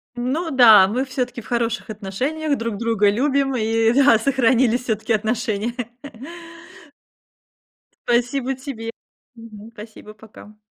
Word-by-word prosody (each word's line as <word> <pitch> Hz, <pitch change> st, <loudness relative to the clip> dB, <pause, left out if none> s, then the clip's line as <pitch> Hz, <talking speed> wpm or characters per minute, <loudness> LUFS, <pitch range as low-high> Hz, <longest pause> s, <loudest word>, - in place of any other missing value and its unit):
Ну 270 Hz, +8 st, -3 dB
да, 220 Hz, -7 st, +7 dB
мы 250 Hz, +6 st, -2 dB
всё-таки 250 Hz, -2 st, -4 dB
в -, -, -16 dB
хороших 235 Hz, -1 st, -2 dB
отношениях, 265 Hz, +10 st, -3 dB
друг 230 Hz, -3 st, -4 dB
друга 225 Hz, -3 st, +1 dB
любим, 270 Hz, +4 st, 0 dB
и 225 Hz, 0 st, +1 dB
да, 275 Hz, -4 st, +5 dB
сохранились 250 Hz, -1 st, +1 dB
всё-таки 220 Hz, -1 st, -2 dB
отношения. 220 Hz, 0 st, -2 dB, 2.3 s
Спасибо 245 Hz, +2 st, 0 dB
тебе. 245 Hz, -4 st, -7 dB, 0.4 s
Мгм. 225 Hz, -1 st, -13 dB
Спасибо, 215 Hz, 0 st, -12 dB
пока. 215 Hz, 0 st, -16 dB
235 Hz, 110 wpm, -20 LUFS, 220-260 Hz, 2.3 s, да